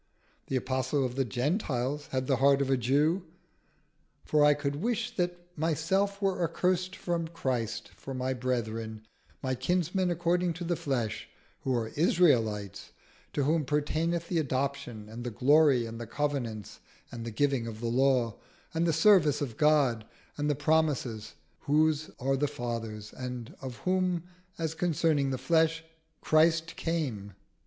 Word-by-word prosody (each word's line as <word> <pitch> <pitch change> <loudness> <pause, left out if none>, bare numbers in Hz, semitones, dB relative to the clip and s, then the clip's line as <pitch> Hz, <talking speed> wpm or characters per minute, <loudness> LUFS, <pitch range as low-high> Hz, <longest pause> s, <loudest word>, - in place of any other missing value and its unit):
The 135 - -2
Apostle 130 +2 0
of 125 - -3
the 135 +1 +1
Gentiles 135 - -1
had 130 0 -2
the 135 -1 +2
heart 140 +1 +5
of 135 -1 0
a - - +5
Jew: 145 - +2 1.0
"For 150 -1 +3
I 145 0 +6
could 145 -1 -2
wish 235 +5 -2
that 175 -1 0 0.2
myself 170 +6 0
were 195 -3 0
accursed 180 +2 0
from 170 -2 -2
Christ 125 -9 -3
for 135 - -7
my 130 +1 -1
brethren, 115 -3 -3 0.4
my 130 -1 0
kinsmen 180 +7 0
according 175 +1 +1
to 175 +2 -6
the 175 0 0
flesh: 120 -8 -2 0.3
who 130 -1 -1
are 115 -2 -1
Israelites; 115 - +1 0.4
to 145 - 0
whom 155 +3 +2
pertaineth 160 +4 0
the 170 -2 0
adoption, 130 -6 -2
and 115 +3 -8
the 120 - -2
glory, 135 +1 +4
and 115 +1 -7
the 115 - -6
covenants, 120 -6 -3 0.3
and 120 -1 -6
the 115 - -4
giving 130 0 0
of 110 -1 -7
the 120 - -5
law, 125 -1 +2 0.4
and 165 +1 +1
the 165 - +2
service 160 -4 +5
of 130 -6 -3
God, 145 -7 +3 0.3
and 150 0 -1
the 145 - +2
promises; 145 -7 0 0.2
whose 155 +1 +2
are 135 +1 +1
the 145 +2 +1
fathers, 115 -4 -5
and 125 -2 -6
of 130 -2 -6
whom 185 -2 0 0.3
as 160 -1 -2
concerning 160 -4 +1
the 130 - -1
flesh 160 +4 +2 0.4
Christ 160 +1 +3
came." 130 - -3
145 Hz, 155 wpm, -29 LUFS, 125-165 Hz, 1.0 s, I